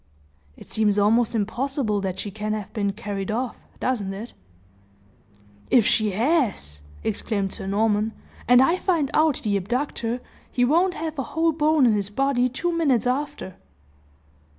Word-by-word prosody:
"It - - -12
seems 210 -2 +2
almost 225 +3 +3
impossible 225 0 -1
that 190 -1 -3
she 205 - -4
can 215 +1 -3
have 210 -1 -5
been 200 -3 0
carried 195 -1 -5
off 240 +2 -2 0.2
doesn't 220 -7 -1
it?" 220 +5 -8 1.4
"If 240 -4 +5
she 215 -2 +2
has!" 220 - 0 0.2
exclaimed 200 -2 -2
Sir - - -6
Norman, 210 +2 +1 0.3
"and 245 +2 +7
I 335 +6 +3
find 335 -8 0
out 310 -2 +3
the 205 -2 +1
abductor, 240 +3 -2 0.3
he 245 - +2
won't 345 +7 +2
have 315 -2 -4
a 270 +3 -6
whole 330 0 +4
bone 305 -2 +3
in 235 - +5
his 200 -1 -1
body 255 +2 +1
two 340 +7 -2
minutes 280 -9 +2
after!" 265 - -3
230 Hz, 150 wpm, -24 LUFS, 205-280 Hz, 1.4 s, and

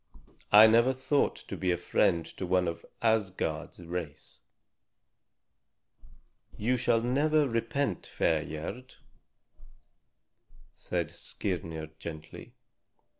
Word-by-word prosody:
I 105 +1 +10
never 115 +4 +5
thought 135 +2 +1
to - - -5
be 95 - -1
a 90 - +2
friend 85 -1 +1
to 95 - -4
one 90 0 +2
of 85 0 -4 0.2
Asgard's 95 -9 0
race." 85 -3 -6 2.2
"You 120 +4 +1
shall 120 -2 +2
never 145 +5 +2
repent, 115 - -1
fair 80 -2 +1
Gerd," 95 +12 -7 1.8
said - - -3
Skirnir 80 -5 -4
gently. 80 -1 -9
95 Hz, 95 wpm, -30 LUFS, 85-120 Hz, 2.2 s, I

